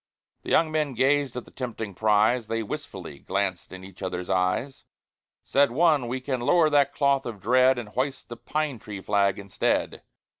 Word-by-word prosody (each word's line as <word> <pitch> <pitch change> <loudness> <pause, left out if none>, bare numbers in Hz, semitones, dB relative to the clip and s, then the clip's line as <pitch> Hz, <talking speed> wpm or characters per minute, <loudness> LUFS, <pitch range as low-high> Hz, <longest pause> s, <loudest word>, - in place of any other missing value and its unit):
The - - -8
young 160 -1 +3
men 150 -4 -1
gazed 135 0 +1
at 125 - -5
the - - -17
tempting 115 -5 -5
prize 110 +4 +2
They 115 0 -2
wistfully 95 - -7
glanced 95 -1 -3
in 95 0 -9
each 95 0 -13
other's 90 -1 -4
eyes; 95 +9 -1 0.6
Said 140 -1 +3
one, 150 -1 +2
"We 125 +2 -3
can 130 -1 -3
lower 160 +4 +3
that 140 -1 +3
cloth 140 -2 +1
of 110 -4 -6
dread 125 +5 +4
And 115 -3 -6
hoist 130 +4 -3
the 120 - -8
pine 140 +2 -3
tree 105 -3 -8
flag 100 -1 +1
instead. 100 -1 -1
120 Hz, 180 wpm, -26 LUFS, 100-140 Hz, 0.6 s, dread